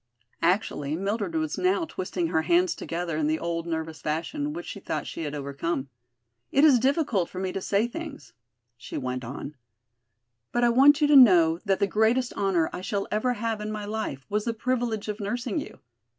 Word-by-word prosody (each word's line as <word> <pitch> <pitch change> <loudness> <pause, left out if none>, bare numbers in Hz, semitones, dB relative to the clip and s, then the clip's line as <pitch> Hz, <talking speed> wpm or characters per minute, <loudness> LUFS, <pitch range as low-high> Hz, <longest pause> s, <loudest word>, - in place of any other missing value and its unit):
Actually, 165 -5 0
Mildred 195 -1 -2
was 155 -1 -1
now 365 -2 +2
twisting 185 - -3
her 160 -2 +2
hands 175 +2 +3
together 170 -1 -4
in 155 -1 +1
the 155 +1 +1
old 170 0 -3
nervous 160 -1 -4
fashion 285 - -2
which 335 +2 -6
she - - -7
thought - - -3
she - - -6
had 150 -2 -4
overcome. 140 0 -3 0.6
"It 275 - +4
is 280 -6 +7
difficult 260 - +1
for - - -10
me 185 0 -2
to 195 - -4
say 200 +3 +1
things," 260 - -8 0.4
she 125 - -7
went 130 -1 -3
on, 135 +4 -6 1.0
"but 240 - +1
I 240 - +5
want 280 +5 +6
you 295 - +5
to 295 - +6
know 175 -10 +7
that 195 -2 +2
the - - +3
greatest 225 +5 +1
honor 185 -5 +1
I - - -5
shall 200 +1 -2
ever 230 +4 +1
have 225 -2 -3
in 210 0 -4
my 210 -1 -4
life 210 -11 -4
was 210 0 -1
the 230 -1 -1
privilege 235 -3 -1
of 210 +1 -4
nursing 225 +2 -2
you. - - -8
200 Hz, 195 wpm, -26 LUFS, 165-240 Hz, 1.0 s, is